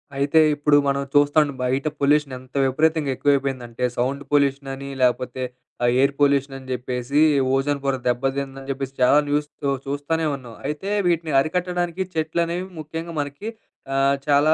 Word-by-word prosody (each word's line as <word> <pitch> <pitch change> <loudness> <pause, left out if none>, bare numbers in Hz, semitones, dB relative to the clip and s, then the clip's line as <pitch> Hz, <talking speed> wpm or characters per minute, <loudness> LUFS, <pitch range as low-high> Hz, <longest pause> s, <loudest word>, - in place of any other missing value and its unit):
అయితే 140 +3 +3 0.2
ఇప్పుడు 145 0 +3
మనం 140 0 +1
చూస్తాను, 145 0 +4
బయట 130 +3 0
పొల్యూషన్ 145 -1 +2
ఎంత 130 +2 -9
విపరీతంగా 155 +1 +1
ఎక్కువైపోయిందంటే, 130 -4 -1
సౌండ్ 130 +3 -1
పొల్యూషనని, 140 -1 0
లేకపోతే 125 0 +1 0.4
ఆహ్, 120 - +4
ఎయిర్ 140 +1 +3
పొల్యూషనని 140 -2 +1
చెప్పేసి, 125 +3 -2 0.4
ఓజోను 140 +1 0
పొర 135 -1 +1
దెబ్బదిందని 135 +2 -2
చెప్పేసి 135 0 -3
చాలా 125 +3 +6
న్యూస్‌తో 145 -1 -1
చూస్తానే 145 +4 -1
ఉన్నాం. 125 -4 -11
అయితే, 150 +6 -4 0.2
వీటిని 165 -2 0
అరికట్టడానికి 175 +3 -1
చెట్లనేవి 170 +3 -1
ముఖ్యంగా 165 +2 -6
మనకి 145 +8 -4 0.5
ఆహ్, 135 0 +3
చాలా 145 +2 +5
140 Hz, 130 wpm, -23 LUFS, 135-150 Hz, 0.5 s, చాలా